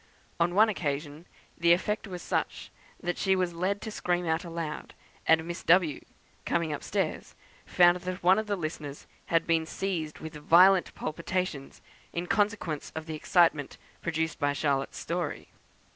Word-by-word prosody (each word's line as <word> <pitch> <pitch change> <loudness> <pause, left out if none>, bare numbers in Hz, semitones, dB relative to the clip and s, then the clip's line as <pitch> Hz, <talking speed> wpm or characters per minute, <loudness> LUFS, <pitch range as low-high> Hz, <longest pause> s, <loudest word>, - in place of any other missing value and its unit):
On 175 +1 +2
one 215 +2 +7
occasion 150 -4 -3 0.3
the 170 0 +5
effect 210 +4 -1
was 180 -2 -7
such - - -2 0.3
that 175 0 -2
she 190 -1 +3
was 180 -2 0
led 185 +4 -1
to 220 - -5
scream 175 -3 -1
out 160 0 0
aloud, 165 -3 -5 0.3
and 160 0 +4
Miss 175 0 -5
W, 170 -4 +3 0.4
coming 165 -2 0
up 145 - -5
stairs, - - -2 0.3
found 175 0 +5
that 180 0 -6
one 185 +3 +5
of 220 - -4
the 205 - 0
listeners 155 -4 -6 0.2
had 165 0 +2
been 165 -1 +1
seized 165 -4 -3
with 160 0 -8
violent 180 +5 +5
palpitations, 170 -2 -4 0.3
in 170 +1 -2
consequence 205 -7 -1
of 160 0 -5
the 160 - -5
excitement 155 -2 +2 0.2
produced 160 -1 -2
by 145 -2 +1
Charlotte's 140 -2 -1
story. 170 -2 -4
170 Hz, 160 wpm, -29 LUFS, 160-185 Hz, 0.4 s, one